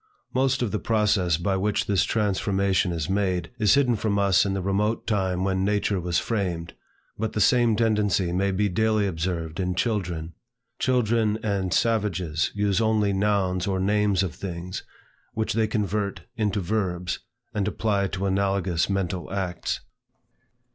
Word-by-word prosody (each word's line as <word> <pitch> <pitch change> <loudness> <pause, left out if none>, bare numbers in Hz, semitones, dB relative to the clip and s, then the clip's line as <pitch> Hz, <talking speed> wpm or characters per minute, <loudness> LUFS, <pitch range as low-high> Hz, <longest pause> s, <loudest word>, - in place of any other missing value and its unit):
Most 130 0 +2
of 110 - -1
the 105 - -1
process 105 -6 +2
by 95 +3 0
which 105 +2 0
this 100 -2 +2
transformation 100 -3 +1
is 80 -2 -2
made, 95 -3 0
is 105 +3 +5
hidden 130 -4 +3
from 105 -1 0
us 100 -1 +3
in 95 - -1
the 95 - -2
remote 105 +4 0
time 95 -4 0
when 95 -1 0
language 100 -1 +1
was 85 -1 0
framed; 90 -7 -2 0.5
but 110 0 -2
the - - -1
same 120 +1 +4
tendency 105 -5 +1
may 95 +3 +1
be 100 +2 +1
daily 110 +2 +1
observed 85 -2 -3
in 90 -1 -1
children. 90 -6 -2 0.5
Children 115 -4 +2
and 100 -4 -1
savages 95 -9 +1
use 100 +1 +1
only 110 -2 +2
nouns 95 -2 +1
or 95 -1 0
names 100 0 +2
of 90 - -3
things, 90 0 -5 0.5
which 110 0 -1
they 110 0 +2
convert 105 -1 -1
into 105 -3 0
verbs, 90 -2 -2 0.3
and 105 -3 -1
apply 105 -2 0
to 95 +1 -3
analogous 95 -3 +1
mental 95 -3 -2
acts. 95 -3 -2
100 Hz, 155 wpm, -25 LUFS, 90-105 Hz, 0.5 s, is